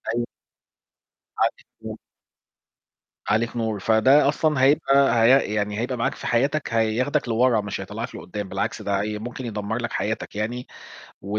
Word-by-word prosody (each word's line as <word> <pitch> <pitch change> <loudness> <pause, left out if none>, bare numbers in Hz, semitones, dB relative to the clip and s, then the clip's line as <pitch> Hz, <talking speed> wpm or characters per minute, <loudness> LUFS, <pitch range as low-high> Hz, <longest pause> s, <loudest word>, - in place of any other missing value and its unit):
أيوه. 120 - 0 1.1
عليك - - 0 0.2
نور. - - -7 1.3
عليك 115 +3 +1
نور. 110 -3 -2
فده 130 +8 +4
أصلًا 150 -2 +1
هيبقى 135 -4 +4
هي 125 -3 +4
يعني 105 0 -1
هيبقى 125 +2 -2
معاك 115 - -1
في - - -7
حياتك، 135 +2 0
هياخدك 115 +4 +1
لورا 115 -1 +3
مش 100 -1 -5
هيطلّعك - - -6
لقدّام، 100 +1 -6
بالعكس - - -3
ده 100 -1 -1
هي 105 +1 -3
ممكن 125 +3 -6
يدمر 105 0 -3
لك 115 - -3
حياتك 110 0 -3
يعني 120 +4 -3 0.6
و 100 +2 -3
115 Hz, 150 wpm, -23 LUFS, 105-130 Hz, 1.3 s, فده